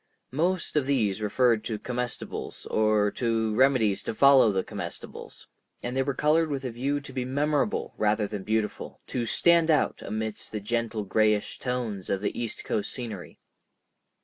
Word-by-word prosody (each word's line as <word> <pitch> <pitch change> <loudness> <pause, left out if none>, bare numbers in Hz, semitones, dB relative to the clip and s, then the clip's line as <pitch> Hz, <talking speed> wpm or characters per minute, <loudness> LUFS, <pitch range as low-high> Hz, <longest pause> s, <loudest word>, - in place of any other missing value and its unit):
Most 170 +7 0
of 145 -3 +2
these 110 -7 +1
referred 115 +1 +2
to 110 - -2
comestibles 125 +2 -5
or 110 -1 +3
to 115 -2 0
remedies 110 -5 +3
to 110 - -4
follow 135 -3 +6
the 95 -1 0
comestibles; - - -8 0.4
and 125 +1 -3
they 135 - +2
were 135 0 -1
colored 155 +3 +3
with 140 -2 -3
a 125 - -2
view 135 +5 -1
to 140 -1 -11
be 130 -1 -2
memorable 145 +7 0
rather 105 0 +2
than 100 -1 -5
beautiful, 110 +1 -2
to 120 -2 -3
"stand 170 +5 +4
out" 155 -2 +2
amidst 110 +1 -4
the 105 - -2
gentle 115 +1 -2
grayish 105 +1 +1
tones 120 -7 -3
of 100 - 0
the 105 - -2
east 120 -2 -4
coast 105 - -2
scenery. 110 -8 -7
115 Hz, 165 wpm, -27 LUFS, 105-135 Hz, 0.4 s, follow